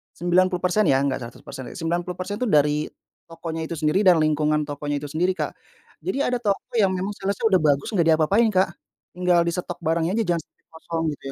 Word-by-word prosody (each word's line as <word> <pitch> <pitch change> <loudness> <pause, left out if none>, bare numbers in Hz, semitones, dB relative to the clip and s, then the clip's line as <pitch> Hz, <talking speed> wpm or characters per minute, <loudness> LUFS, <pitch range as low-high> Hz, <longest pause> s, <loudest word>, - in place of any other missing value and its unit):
90% 180 +3 +2
ya, 135 - +4
nggak 135 -1 0
100%. 125 +2 -10
90% 180 +4 -3
itu 250 - 0
dari 150 -3 +2 0.4
tokonya 165 -1 -5
itu 170 - -4
sendiri 155 +3 +1
dan 180 - +8
lingkungan 150 0 +1
tokonya 145 0 -4
itu 145 - -6
sendiri 180 +4 +1
Kak. - - -2 0.5
Jadi 370 - -3
ada 250 -2 +1
toko 205 -4 -2
yang 195 -2 +4
memang 190 +3 -2
sales-nya 200 +3 -2
udah 185 - +5
bagus 140 +5 +1
nggak 175 -6 +2
diapa-apain 195 +9 +3
Kak, 190 -3 +3 0.4
tinggal 180 -1 +2
di 170 - -1
stok 175 0 -4
barangnya 165 +3 +1
aja 225 - +1
jangan - - -1
sampai - - -46
kosong 165 0 -4
gitu 145 - -10
170 Hz, 190 wpm, -23 LUFS, 155-185 Hz, 0.5 s, dan